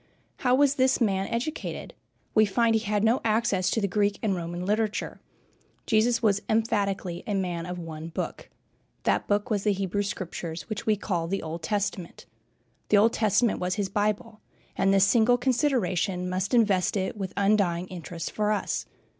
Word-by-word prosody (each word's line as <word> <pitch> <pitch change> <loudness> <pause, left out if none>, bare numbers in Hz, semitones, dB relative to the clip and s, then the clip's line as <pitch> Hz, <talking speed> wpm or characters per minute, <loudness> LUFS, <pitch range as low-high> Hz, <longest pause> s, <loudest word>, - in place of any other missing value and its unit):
How 250 -1 +2
was 285 +1 +3
this 260 0 +3
man 195 -5 +1
educated? 250 +7 -4 0.4
We 215 - +5
find 230 +3 +2
he 220 - +3
had 210 -1 0
no 225 +3 +3
access 215 -4 +1
to 225 - 0
the 200 - 0
Greek 205 +1 +1
and 205 -3 +1
Roman 175 +1 -4
literature. 210 +1 -1 0.6
Jesus 230 +2 +2
was 205 -2 +3
emphatically 200 -5 0
a 205 - -1
man 180 -3 -2
of 180 0 -5
one 160 -2 -7
book. 165 - -5 0.5
That - - +1
book 205 +4 0
was 205 -2 0
the 210 - +3
Hebrew 195 +1 -1
Scriptures, 175 -4 -5
which 215 0 -5
we 215 - +4
call 175 -5 -2
the 195 +3 -2
Old 165 +1 -5
Testament. 195 -1 -3 0.6
The 210 - +5
Old 225 +3 +4
Testament 220 +1 +2
was 180 0 -1
his 200 -3 -2
Bible, 210 +1 -1 0.3
and 195 0 +2
this 195 0 +5
single 235 +3 +4
consideration 215 - 0
must 185 +6 -1
invest 205 -4 +3
it 190 -1 -2
with 195 -3 -5
undying 200 -4 +2
interest 175 -1 -6
for 210 0 0
us. 210 - -2
200 Hz, 170 wpm, -27 LUFS, 185-220 Hz, 0.6 s, We